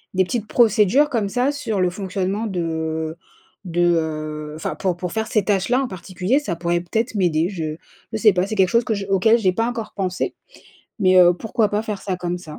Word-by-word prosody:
des 190 - +4
petites 220 +1 -3
procédures 230 +5 +4
comme 220 -6 0
ça 250 +6 +1
sur 285 -8 -3
le 180 - +3
fonctionnement 195 +3 -2
de 160 -3 -3 0.5
de, 175 -1 -1
heu, 155 -1 -3
enfin 155 - -4
pour 185 -3 -1
pour 180 -1 -4
faire 220 -1 -1
ces 215 - +1
tâches-là 210 +6 +1
en - - -2
particulier, 185 +5 -1
ça 235 -13 -3
pourrait 170 +1 -1
peut-être 225 +8 -2
m'aider. 170 -3 +1
Je 160 -6 -4 0.4
je - - 0
sais 215 -1 +5
pas 180 +1 0
c'est 215 - -3
quelque 190 -3 +3
chose 235 0 +2
que 220 - 0
j 200 -1 -4
auquel 200 +4 +4
j'ai 190 -4 +2
pas 225 +5 0
encore 230 -3 -5
pensé 185 -2 -2 0.7
mais, 185 -1 +5
heu, 175 0 +6
pourquoi 220 +3 0
pas 210 +1 0
faire 210 -3 -5
ça 190 -2 -2
comme 180 0 -3
ça. 155 -4 -10
190 Hz, 215 wpm, -21 LUFS, 175-220 Hz, 0.7 s, heu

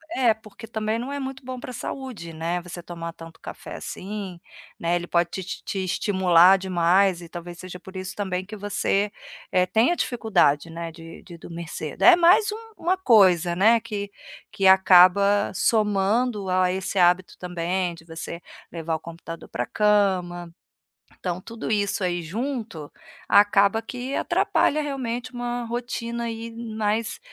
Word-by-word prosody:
é, 245 -4 +4
porque 220 +1 -13
também 220 0 -2
não 245 +4 -5
é 285 - -3
muito 265 0 -6
bom 255 0 -6
para 255 - -8
saúde, 245 -8 -6
né, 165 +2 -2
você 175 0 -8
tomar 170 -1 -7
tanto 165 0 -13
café - - -8
assim, 195 -2 -6 0.4
né, 170 +1 +1
ele 175 0 -2
pode 170 0 +1
te 190 - -5
te 185 - -6
te 195 -1 -3
estimular 185 -1 +4
demais, 185 0 +2
e 170 - -9
talvez 175 0 -9
seja 185 0 -8
por 185 +1 -13
isso 185 0 -6
também 185 -2 -3
que 210 +3 -8
você, 205 0 -1 0.4
eh, 180 0 +3
tenha 225 - +2
dificuldade, 205 - +1
né, 165 0 -6
de 165 0 -12
de 170 -3 -12
dormir 170 0 -8
cedo. 155 -2 -5
É 360 0 +9
mais 365 +5 +5
um 450 +1 -11
uma 355 +3 +1
coisa, 190 - +4
né, 220 +6 +4
que 205 -3 -5 0.4
que 195 - -2
acaba 190 +2 +6
somando 210 +1 +1
a 185 0 +2
esse 190 +1 -3
hábito 180 0 +3
também 180 0 -2
de 165 -1 -15
você 165 +1 -7 0.3
levar 165 -1 -3
o - - -4
computador 165 0 -9
para 120 - -3
cama. 185 - +1 0.7
Então 180 0 -3
tudo 230 +3 -7
isso 205 -1 0
aí 175 -1 -1
junto, 215 - -5 0.4
acaba 205 +1 +4
que 250 +3 -5
atrapalha 305 - +1
realmente 255 -3 -4
uma 240 0 -3
rotina 235 0 -4
aí, 230 0 -5
mais 225 - -2
195 Hz, 160 wpm, -24 LUFS, 175-230 Hz, 0.7 s, É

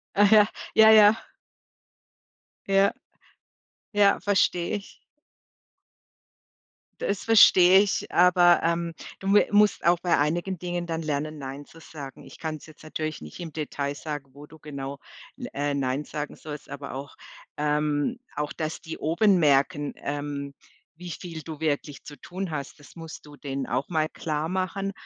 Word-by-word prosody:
Ach 205 0 +5
ja, 215 -1 +7 0.3
ja, 220 0 +8
ja. 215 0 +8 1.5
Ja. 195 0 +3 1.0
Ja. 205 -1 +4
Verstehe 185 -3 +1
ich. 200 - -14 2.0
Das 200 0 -2
verstehe 190 -4 +7
ich, 205 -1 -1
aber, 175 0 +5
ähm, 170 0 0 0.3
du 195 +1 0
m - - +6
musst 210 -1 +3
auch 175 +1 +4
bei 175 -1 +2
einigen 175 +5 -1
Dingen 175 0 -4
dann 165 -1 -3
lernen 155 0 -3
„Nein“ 135 +1 -7
zu 165 - -17
sagen. 145 -4 -10
Ich - - -14
kann's 155 -2 -5
jetzt 155 - -16
natürlich 155 -1 -4
nicht 75 - -10
im 165 -3 -7
Detail 145 -2 -3
sagen, 145 -2 -6
wo 145 +1 -12
du 160 +1 -16
genau, 140 -2 -7 0.4
l 245 - -7
äh, 145 0 -1
„Nein“ 135 +1 -1
sagen 150 0 -6
sollst, 150 -2 -9
aber 140 0 -7
auch 140 +1 -8 0.4
ähm, 150 - 0 0.2
auch, 150 0 -2
dass 155 +2 -4
die 160 - -8
oben 180 +5 +3
merken, 145 -1 +2
ähm, 145 -1 -5 0.4
wie 175 +1 -9
viel 165 0 -7
du 155 0 -8
wirklich 145 -2 -2
zu 145 - -9
tun 185 -1 -5
hast. 140 -1 -5
Das 145 - -17
musst 165 -2 -10
du 145 - -13
denen 135 -2 -4
auch 130 +3 -2
mal 155 -3 0
klarmachen, 185 +6 -3
155 Hz, 155 wpm, -26 LUFS, 145-180 Hz, 2.0 s, ja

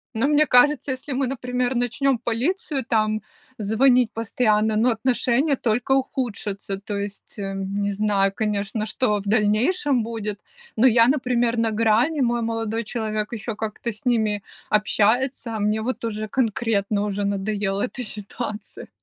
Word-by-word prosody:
Но 230 +5 +2
мне 300 +1 +4
кажется, 275 +2 +4
если 260 +2 -6
мы, 265 0 0
например, 250 0 -2
начнем 245 +2 +1
полицию 265 - -1
там 215 -3 +1 0.4
звонить 240 +3 +3
постоянно, 220 -1 +1
но 240 +3 +3
отношения 255 +4 +1
только 245 +2 -1
ухудшатся. 220 -7 -1
То 205 +1 -5
есть, 200 +1 -7
э, 195 -1 -4
не 200 +1 -2
знаю, 200 -1 +1
конечно, 210 0 -2
что 215 -1 0
в 200 - -8
дальнейшем 225 - +2
будет, 215 -3 -4 0.4
но 250 +4 +6
я, 230 -1 +5
например, 245 -3 +1
на 230 -1 +1
грани, 230 +8 +2
мой 240 -1 +1
молодой 225 0 -2
человек 215 -1 -3
еще 225 0 -4
как-то 220 +2 -4
с 215 - -12
ними 220 -4 +1 0.3
общается. 225 +3 +1
А - - -3
мне 210 +1 +1
вот 240 +1 -3
уже 215 -1 -3
конкретно, 215 -4 0
уже 205 0 -2
надоела 200 0 -1
эта 250 +1 -3
ситуация. 210 0 -5
225 Hz, 150 wpm, -23 LUFS, 210-250 Hz, 0.4 s, но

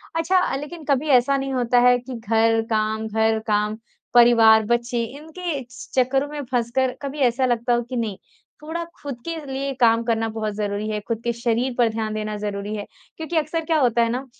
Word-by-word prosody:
अच्छा, 360 -1 +2
लेकिन 300 +3 -7
कभी 280 +2 +2
ऐसा 275 +3 0
नहीं 270 0 -3
होता 245 -1 +2
है 245 - +5
कि 250 0 -8
घर, 225 +1 +2
काम 220 0 0
घर, 220 0 +1
काम, 210 +1 +1 0.4
परिवार, 230 -2 +7
बच्चे, 235 +1 0
इनके 320 -1 -5 0.4
चक्करों 270 +3 0
में 295 0 -6
फँसकर 250 +2 0
कभी 280 +1 -5
ऐसा 255 +2 0
लगता 240 0 +1
हो 240 - +2
कि 255 - -4
नहीं, 220 -5 -2 0.4
थोड़ा 330 +2 -4 0.2
खुद 280 -3 -5
के 335 0 -3
लिए 270 0 -3
काम 230 -1 +4
करना 225 -1 0
बहुत 215 -1 -2
ज़रूरी 205 0 -2
है, 210 -1 -2
खुद 230 -1 -2
के 235 - 0
शरीर 235 +2 -1
पर 235 -2 +4
ध्यान 220 -1 -3
देना 215 0 -3
ज़रूरी 205 0 -4
है। 205 - -5 0.3
क्योंकि 320 +1 -3
अक्सर 315 +1 -1
क्या 320 -1 +2
होता 240 -3 +3
है 230 - +2
ना, 255 +3 -3
240 Hz, 195 wpm, -22 LUFS, 220-275 Hz, 0.4 s, परिवार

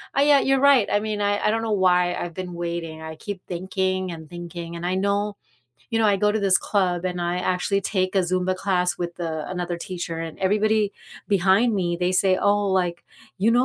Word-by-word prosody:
I 275 - +4
yeah, 285 -1 +6
you're 270 0 +2
right, 275 -6 +5
I 205 - +3
mean, 210 -1 -3
I 205 0 +1
I - - +4
don't 225 +1 0
know 225 -1 -2
why 180 -2 +3
I've 175 - -5
been 180 0 -6
waiting. 170 -2 -4
I 160 0 -7
keep 195 +3 -7
thinking 185 +1 -2
and 160 -2 -9
thinking 170 -1 -7
and 170 - -7
I 180 - 0
know. 200 +1 0 0.6
You 225 - +2
know, 225 - +3
I 205 -1 +4
go 210 +1 +3
to 215 - 0
this 195 -2 +4
club 185 -4 0
and 180 -1 -2
I 175 +1 -1
actually 185 +2 0
take 185 -1 -1
a 195 - +4
Zumba 185 +1 0
class 180 -2 0
with, 175 0 -5
uh, 160 -2 -3
another 175 -1 -3
teacher 170 -1 -5
and 165 -1 -6
everybody 210 +1 +2 0.4
behind 200 +4 +3
me, 175 -3 0
they 180 +1 +1
say, 185 0 +3
"Oh, 205 +1 +2
like, 180 -2 0 0.4
you 210 +4 +3
know, 245 +2 +4
185 Hz, 220 wpm, -23 LUFS, 175-205 Hz, 0.6 s, yeah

